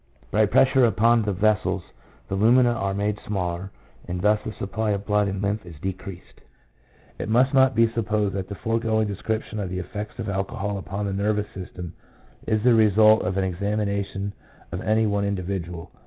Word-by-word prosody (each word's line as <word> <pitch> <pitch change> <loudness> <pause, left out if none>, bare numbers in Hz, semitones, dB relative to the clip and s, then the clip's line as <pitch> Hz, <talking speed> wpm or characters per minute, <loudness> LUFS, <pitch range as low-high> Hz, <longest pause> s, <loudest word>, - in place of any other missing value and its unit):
By 105 +1 +3
pressure 130 +4 +4
upon 115 +1 +4
the 105 -1 -1
vessels 105 +1 +1 0.4
the - - -5
lumina 120 +5 +4
are 100 -4 -2
made 105 +1 -1
smaller, 90 -2 -3 0.4
and 90 0 -3
thus 105 +3 +3
the - - -4
supply 110 +1 -3
of 100 0 -4
blood 105 0 +2
and 95 0 -3
lymph 100 +2 -1
is 85 -2 -11
decreased. 95 0 -7 0.8
It - - -4
must 125 +5 +3
not 130 -2 +5
be 115 +1 +5
supposed 105 -3 -1
that 95 -1 -4
the 100 - -5
foregoing 110 0 0
descrip 110 +3 -2
tion 110 - -7
of 95 -3 -3
the 90 - -4
effects 105 +3 -6
of 115 -3 -4
alcohol 100 +1 -2
upon 100 +2 -4
the 100 - -2
nervous 105 +1 -1
system 90 -2 -8 0.5
is 110 -1 +1
the 125 -1 +5
result 110 0 +5
of 95 +1 -2
an 95 - +1
examination 100 +1 -2 0.4
of 85 - -4
any 110 +1 +2
one 100 -1 0
individual. 90 -3 -4
105 Hz, 185 wpm, -24 LUFS, 95-110 Hz, 0.8 s, not